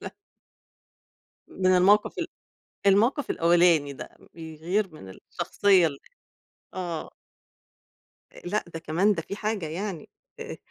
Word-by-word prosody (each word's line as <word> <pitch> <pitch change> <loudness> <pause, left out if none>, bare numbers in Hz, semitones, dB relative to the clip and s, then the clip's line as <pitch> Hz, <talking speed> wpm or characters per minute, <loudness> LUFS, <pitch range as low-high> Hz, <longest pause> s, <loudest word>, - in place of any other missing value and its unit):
ل - - -5 1.4
من 185 - -3
الموقف 200 +4 +3
ال - - -1 0.6
الموقف 230 +8 +3
الأولاني 170 -4 +3
ده، 135 - -10 0.2
بيغِير 165 +5 -2
من 95 -11 -11
الشخصية 185 - +1
ال 140 -3 -4 0.8
آه. 175 -4 -4 1.2
آآ، - - -13
لأ، 210 +4 -1
ده - - -3
كمان 170 +6 +1
ده 165 - -4
في 200 - -7
حاجة 210 -5 -2
يعني 175 0 -5 0.3
آآ، - - -6
180 Hz, 120 wpm, -26 LUFS, 160-200 Hz, 1.4 s, الموقف